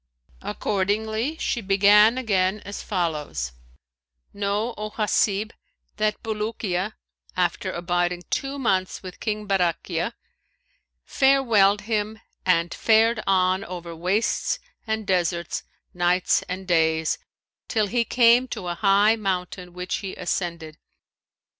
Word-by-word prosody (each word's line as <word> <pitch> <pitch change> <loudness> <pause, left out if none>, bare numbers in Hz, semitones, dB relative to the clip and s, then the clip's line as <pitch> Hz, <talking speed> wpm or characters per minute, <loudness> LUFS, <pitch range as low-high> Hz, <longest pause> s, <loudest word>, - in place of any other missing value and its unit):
Accordingly, 215 +7 -1
she 240 - -1
began 205 +3 +5
again 200 -5 +1
as 200 - -6
follows: 150 - -2 0.8
"Know, 205 +3 -1
O 215 0 -5
Hasib, 210 0 +1 0.5
that 215 0 0
Bulukiya, 210 -3 -2 0.4
after 180 +1 0
abiding 175 0 -1
two 275 +1 -2
months 190 -9 0
with 185 -1 -9
King 210 -1 -3
Barakhiya, 180 0 0 0.9
farewelled 230 -8 +4
him 215 0 -2 0.3
and 170 -1 +2
fared 225 0 +3
on 185 0 +2
over 175 -2 -7
wastes 185 +7 0 0.3
and 220 -1 -2
deserts 175 -2 -1 0.3
nights 175 0 +2
and 185 +1 -5
days' 160 -2 +2 0.5
till 215 -2 +1
he 235 +4 +1
came 240 +1 +4
to 180 -7 -5
a - - -1
high 200 +4 +4
mountain 180 -3 -3
which 180 +1 -3
he 195 -3 -6
ascended. 170 -3 -3
195 Hz, 110 wpm, -24 LUFS, 180-220 Hz, 0.9 s, began